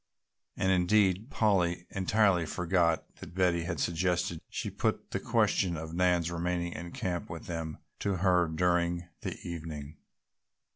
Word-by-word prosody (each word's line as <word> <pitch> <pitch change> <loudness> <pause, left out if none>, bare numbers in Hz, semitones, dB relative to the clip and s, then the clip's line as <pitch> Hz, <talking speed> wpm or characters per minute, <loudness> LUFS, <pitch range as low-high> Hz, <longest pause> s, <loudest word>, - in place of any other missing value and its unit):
And 95 - +2
indeed 95 +3 +3
Polly 90 -7 +2
entirely 95 -3 +2
forgot 85 -1 0
that 85 - -11
Betty 90 -3 +2
had 85 -4 -3
suggested 85 0 0
she - - -4
put - - -1
the - - -1
question 90 -4 +2
of 80 +1 -6
Nan's 90 -1 +2
remaining 85 0 -1
in 85 +1 -7
camp 90 -2 -3
with 85 - -7
them 80 -3 -4 0.2
to 100 -1 0
her 90 -1 +3
again 80 -1 -5
during 85 0 +1
the - - -4
evening. 80 -3 -6
85 Hz, 145 wpm, -30 LUFS, 85-90 Hz, 0.2 s, indeed